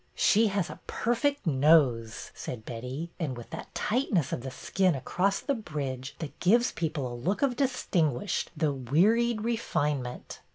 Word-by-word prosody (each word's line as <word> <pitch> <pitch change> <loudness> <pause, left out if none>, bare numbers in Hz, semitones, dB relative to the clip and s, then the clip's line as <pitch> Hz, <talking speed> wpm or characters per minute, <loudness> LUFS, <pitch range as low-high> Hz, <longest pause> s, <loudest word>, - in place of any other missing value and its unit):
" - - -38 0.2
She 220 +2 +5
has 195 -3 0
a - - -10
perfect 280 +4 0
nose," 135 -7 +3
said 110 -3 -7
Betty, 125 +8 -5
'' - - -37
and 140 -7 -2
with 120 - -10
that - - -8
tightness 210 - +1
of - - -2
the 130 - -5
skin 185 +5 +1
across 185 +8 0
the 280 - -1
bridge 140 - -4
that 155 -3 -7
gives 235 +7 +4
people 145 -7 -3
such - - -11
a - - +1
look 205 - 0
of 265 -3 +2
distinguished, 200 - 0
though 150 -2 +1
wearied, 210 - +2
refinement." 150 - -2
165 Hz, 170 wpm, -29 LUFS, 130-215 Hz, 0.2 s, She